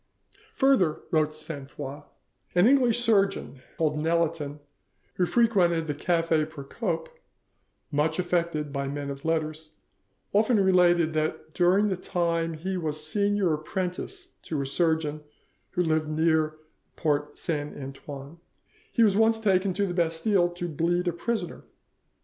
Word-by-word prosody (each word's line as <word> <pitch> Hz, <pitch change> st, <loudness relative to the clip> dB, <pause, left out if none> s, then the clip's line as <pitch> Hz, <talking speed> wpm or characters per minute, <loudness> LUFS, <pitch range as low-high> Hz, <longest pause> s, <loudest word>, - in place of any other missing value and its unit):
"Further," 230 Hz, -, +3 dB
wrote 155 Hz, -1 st, +2 dB
Sainte 150 Hz, -3 st, -7 dB
Foix, 140 Hz, +2 st, -7 dB, 0.5 s
"an 175 Hz, +2 st, +5 dB
English 245 Hz, -2 st, +4 dB
surgeon 200 Hz, -, +1 dB, 0.2 s
called 150 Hz, -2 st, +1 dB
Nelaton, 160 Hz, -2 st, 0 dB, 0.6 s
who 180 Hz, -, +2 dB
frequented 185 Hz, -9 st, +3 dB
the 150 Hz, -, -2 dB
Cafe 165 Hz, 0 st, +1 dB
Procope, 160 Hz, -, -4 dB, 0.8 s
much 150 Hz, +2 st, +1 dB
affected 170 Hz, -5 st, -1 dB
by 140 Hz, -1 st, -2 dB
men 140 Hz, 0 st, -4 dB
of 140 Hz, 0 st, -8 dB
letters, 155 Hz, -1 st, -2 dB, 0.6 s
often 215 Hz, +2 st, +4 dB
related 175 Hz, -4 st, +4 dB
that 155 Hz, 0 st, -2 dB
during 185 Hz, +4 st, +3 dB
the 190 Hz, -, -1 dB
time 170 Hz, -2 st, -1 dB
he 185 Hz, +4 st, -3 dB
was 155 Hz, -3 st, -2 dB
senior 200 Hz, 0 st, +1 dB
apprentice 185 Hz, -, -4 dB
to 155 Hz, -, -3 dB
a -, -, -4 dB
surgeon 155 Hz, 0 st, 0 dB, 0.5 s
who 180 Hz, -, +1 dB
lived 155 Hz, -2 st, 0 dB
near 155 Hz, 0 st, +2 dB
the 155 Hz, 0 st, -29 dB
Porte 150 Hz, -2 st, 0 dB
Saint 150 Hz, -3 st, -3 dB
Antoine, 140 Hz, +3 st, -9 dB, 0.5 s
he 230 Hz, -, +3 dB
was 205 Hz, -3 st, +4 dB
once 225 Hz, +1 st, +4 dB
taken 195 Hz, -3 st, +2 dB
to 200 Hz, +3 st, 0 dB
the 180 Hz, -, -3 dB
Bastille 175 Hz, +2 st, +2 dB
to 175 Hz, 0 st, -5 dB
bleed 175 Hz, +3 st, 0 dB
a -, -, -3 dB
prisoner. 225 Hz, +7 st, -3 dB
165 Hz, 140 wpm, -27 LUFS, 155-185 Hz, 0.8 s, an